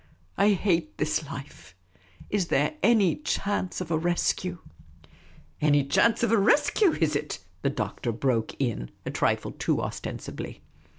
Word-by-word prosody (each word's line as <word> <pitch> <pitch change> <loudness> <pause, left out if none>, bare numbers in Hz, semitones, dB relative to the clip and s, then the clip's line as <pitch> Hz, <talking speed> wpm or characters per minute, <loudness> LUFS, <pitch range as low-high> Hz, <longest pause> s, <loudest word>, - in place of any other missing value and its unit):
I 205 +1 +4
hate 170 -5 0
this 155 0 -1
life. 135 -10 -9 0.6
Is 195 -4 +1
there 150 +1 +2
any 210 -4 +4
chance 200 -10 -2
of 170 -2 -5
a 160 - +3
rescue? 175 +1 0 0.3
' 80 +1 -26
' - - -27
" 75 +2 -28
Anny 145 -1 +4
chance 230 +12 +3
of 230 - +2
a 230 - +5
rescue, 310 - +4
is 160 -2 +1
it? 150 - -2
" 90 0 -35
the - - +1
Doctor 120 - -3
broke 115 -1 0
in, 115 - -2 0.2
a - - -3
trifle - - 0
too - - 0
ostensibly. - - -6
160 Hz, 165 wpm, -27 LUFS, 135-200 Hz, 0.6 s, a